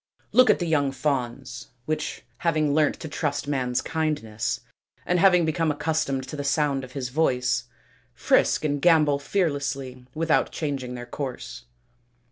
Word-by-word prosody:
Look 255 0 +6
at - - +6
the 175 - -2
young 145 -4 +2
fawns 130 -3 -3 0.2
which, 155 0 -3 0.2
having 155 -3 +1
learnt 150 0 +2
to - - -5
trust 145 -2 -2
man's 125 -4 0
kindness, 150 -10 -2 0.4
and 180 0 +2
having 180 -2 +5
become 160 +1 +1
accustomed 145 -3 -1
to - - -5
the 145 - -4
sound 140 -1 +1
of 130 0 -10
his 130 -3 -3
voice, 125 -3 +1 0.5
frisk - - +2
and 145 -1 0
gambol 155 -5 +4
fearlessly 140 -6 -2
without 165 0 +2
changing 135 -5 -3
their 120 0 -6
course. 125 - -6
145 Hz, 145 wpm, -25 LUFS, 130-155 Hz, 0.5 s, Look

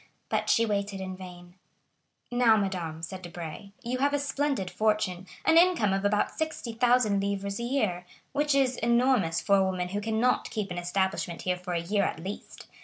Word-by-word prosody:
But - - 0
she 230 - +4
waited 200 -2 -2
in 190 0 -5
vain. 175 -1 -11 0.8
"Now, 245 -2 +5
madame," 175 -5 -3
said 185 +2 -6
Debray, 175 +1 -8
"you 250 +2 -2
have 285 +2 +2
a - - +2
splendid 280 -8 -1
fortune, 210 -3 0 0.2
an 325 - +7
income 340 - +3
of 195 0 -1
about 205 +1 +2
60,000 245 -8 +1
livres 200 0 -2
a - - -3
year, 215 -9 -1 0.2
which 290 0 +1
is 260 -2 +2
enormous 235 -8 +2
for 200 -2 +4
a 195 - +4
woman 185 -1 -1
who 205 +2 -2
cannot 225 +3 +1
keep 210 -4 -3
an 175 - -3
establishment 175 -1 -1
here 180 0 +1
for 180 0 -6
a 170 - +1
year, 200 +4 +1
at - - -1
least. 190 +5 -8
200 Hz, 180 wpm, -28 LUFS, 180-240 Hz, 0.8 s, an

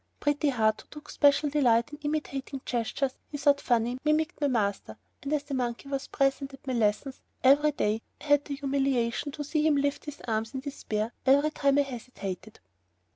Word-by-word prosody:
Pretty 290 0 +1
Heart, 220 -4 +1
who - - -23
took 300 -1 -11
special 285 0 +3
delight 245 -3 +3
in 295 - -8
imitating 280 -2 -3
gestures 245 +3 -1 0.2
he 290 - -5
thought 285 0 +3
funny, 240 +1 +1
mimicked 305 +1 +1
my 290 - +3
master, 200 - -1 0.2
and 280 - -5
as 300 -2 +1
the 285 -1 -7
monkey 245 +1 -2
was 275 -1 -3
present 275 0 0
at 270 - -24
my 260 - -2
lessons 230 +4 0 0.2
every 285 +3 +6
day, 220 -6 0 0.2
I - - -15
had 290 -1 +3
the 285 - -4
humiliation 275 -2 0
to 295 - -4
see 300 +2 0
him 305 - +4
lift 285 0 0
his 295 -1 -7
arms 225 +3 -2
in 265 - -3
despair 230 -5 -3
every 285 +3 +5
time 280 -2 +2
I 285 - +5
hesitated. 220 -6 -7
275 Hz, 190 wpm, -28 LUFS, 235-290 Hz, 0.2 s, every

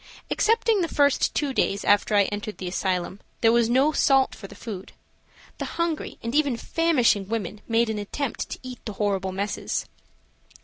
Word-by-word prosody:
Excepting 455 -2 +2
the 335 - +1
first 285 -3 +2
two 285 -3 0
days 200 -5 0
after 205 +1 +3
I 200 - +6
entered 210 +2 -4
the 185 - -5
asylum, 185 +1 -2 0.2
there 225 - +5
was 235 -1 +3
no 265 +5 +4
salt 270 -3 +3
for 195 - -9
the - - -13
food. 195 -5 -8 0.7
The - - -2
hungry 335 -2 -2
and 230 +1 -3
even 285 -5 +2
famishing 245 - +2
women 215 -2 -3
made 230 0 +2
an 220 -1 -2
attempt 250 +6 -4
to - - -6
eat 255 -1 -9
the 215 - -4
horrible 195 -2 -1
messes. 200 +2 -2
230 Hz, 175 wpm, -25 LUFS, 205-280 Hz, 0.7 s, I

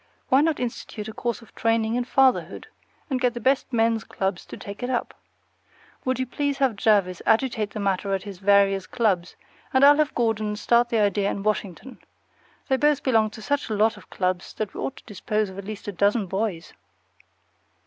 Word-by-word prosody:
Why 265 +2 +5
not 315 0 +1
institute 230 -3 -5
a 220 - -7
course 235 0 -3
of - - -19
training 225 -1 +1
in 245 0 0
fatherhood, 265 0 +2 0.4
and 260 -4 -2
get 245 -1 +1
the - - -3
best 265 +3 +1
men's 225 -2 +2
clubs 190 -2 -3
to - - -9
take 200 +3 -9
it 245 - -2
up? 245 -2 -2 0.9
Will 260 0 0
you 260 - -1
please 285 +2 -2
have 265 -5 +1
Jervis 200 -4 +2
agitate 220 -2 +1
the 205 - -7
matter 195 0 -1
at 190 - -5
his 200 -3 -9
various 195 -1 +3
clubs, 190 -7 0 0.4
and 260 +1 +3
I'll 290 +1 +7
have 305 -1 +1
Gordon 220 -3 0
start 235 +3 +2
the 230 - +1
idea 205 -1 +2
in 195 - -4
Washington. 210 +3 -3 0.7
They 265 - +2
both 295 0 +2
belong 225 -5 +3
to 220 0 -11
such 285 +2 -1
a 215 - -1
lot 215 +2 +3
of - - -16
clubs 185 -1 -2
that 215 -3 -4
we - - -8
ought 270 - -3
to - - -13
dispose 210 -1 -2
of 190 - -9
at 200 - -8
least 215 0 -7
a - - -2
dozen 200 +3 +1
boys. 190 -2 -3
220 Hz, 200 wpm, -24 LUFS, 200-250 Hz, 0.9 s, I'll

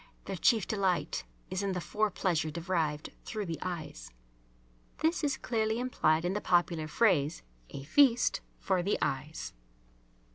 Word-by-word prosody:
Their 195 - -4
chief 220 +2 +3
delight 190 - 0 0.3
is 185 - -1
in 200 -1 -1
the 180 - -1
fore 215 +4 0
pleasure 175 -5 0
derived 160 -2 -2
through 215 -3 -4
the 165 -3 -4
eyes. 155 - -5 0.9
(This 325 +1 +1
is 285 -2 +1
clearly 220 -1 0
implied 165 -10 +2
in 180 - +1
the 210 - -2
popular 175 -3 +2
phrase 160 -4 +2 0.3
"a 135 - -7
feast 240 - +4 0.2
for 190 -3 0
the 200 +4 +1
eyes.") 150 +4 -3
185 Hz, 145 wpm, -31 LUFS, 155-215 Hz, 0.9 s, feast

